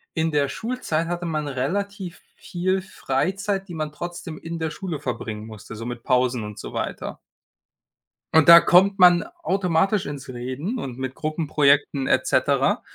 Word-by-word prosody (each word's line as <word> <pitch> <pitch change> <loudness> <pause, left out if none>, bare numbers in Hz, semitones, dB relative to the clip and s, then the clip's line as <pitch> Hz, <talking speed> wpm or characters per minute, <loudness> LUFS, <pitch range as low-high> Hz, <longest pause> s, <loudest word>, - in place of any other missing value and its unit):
in 160 0 +1
der 145 -1 +2
Schulzeit 170 - -2
hatte 175 0 -3
man 155 -3 -2
relativ 180 - -3
viel 185 +2 -2
Freizeit, 195 +6 -2
die 175 - -8
man 155 -1 -3
trotzdem 170 0 -7
in 165 0 -6
der 160 - -1
Schule 170 -2 -5
verbringen 110 -5 -5
musste, 110 0 -10
so 115 +2 -6
mit 120 -1 -6
Pausen 125 -2 +1
und 105 0 -8
so - - -7
weiter. - - -4 1.2
Und 160 0 +6
da 170 0 +12
kommt 195 +2 +5
man 175 -3 +7 0.2
automatisch 190 +1 +1
ins 145 -2 -7
Reden 130 - -4
und 125 - -6
mit 130 0 -4
Gruppenprojekten 145 -3 +1
et - - +2
cetera. - - +2
160 Hz, 160 wpm, -23 LUFS, 130-180 Hz, 1.2 s, da